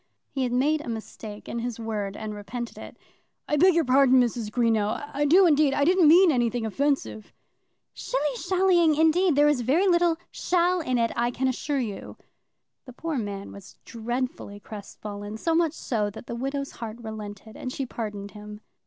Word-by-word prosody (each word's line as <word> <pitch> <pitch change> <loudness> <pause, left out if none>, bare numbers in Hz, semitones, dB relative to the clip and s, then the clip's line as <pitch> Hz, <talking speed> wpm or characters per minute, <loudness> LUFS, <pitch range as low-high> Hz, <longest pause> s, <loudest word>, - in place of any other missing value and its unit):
He 270 - -3
had 250 -2 0
made 295 +5 +2
a 275 - -7
mistake 220 -1 -7
in 235 - -4
his 235 -1 -4
word 210 -3 -4
and 215 -1 -5
repented 230 +3 -6
it. - - -10 0.5
"I 295 - +1
beg 360 +4 +5
your 335 -2 +3
pardon, 260 0 +5
Mrs. 235 -3 0
Greenow; 225 +3 0
I 290 +1 0
do 360 +6 +6
indeed. 295 -4 +4
I 285 - +2
didn't 360 -1 +5
mean 345 +3 +7
anything 240 -3 0
offensive." 270 -2 -1 0.6
"Shilly 300 - -2
shallying, 355 0 +3
indeed! 320 +2 +3
There's 295 -2 +4
very 300 - +2
little 345 -2 +3
shall 360 0 +1
in 255 -3 0
it, 230 -1 +1
I 240 +1 +1
can 260 +2 -1
assure 280 +3 -2
you." 215 -6 -5 0.7
The 255 - -11
poor 315 +1 -3
man 200 -2 -5
was 200 -1 -12
dreadfully 235 -3 -4
crestfallen, 205 0 -8
so 330 +8 0
much 325 -2 +2
so 215 -9 -2
that 205 - -11
the - - -6
widow's 275 +3 -3
heart 225 -1 -7
relented, 215 -1 -8
and 255 - -5
she 270 - -3
pardoned 210 -4 -6
him. 210 0 -10
250 Hz, 180 wpm, -26 LUFS, 220-300 Hz, 0.7 s, mean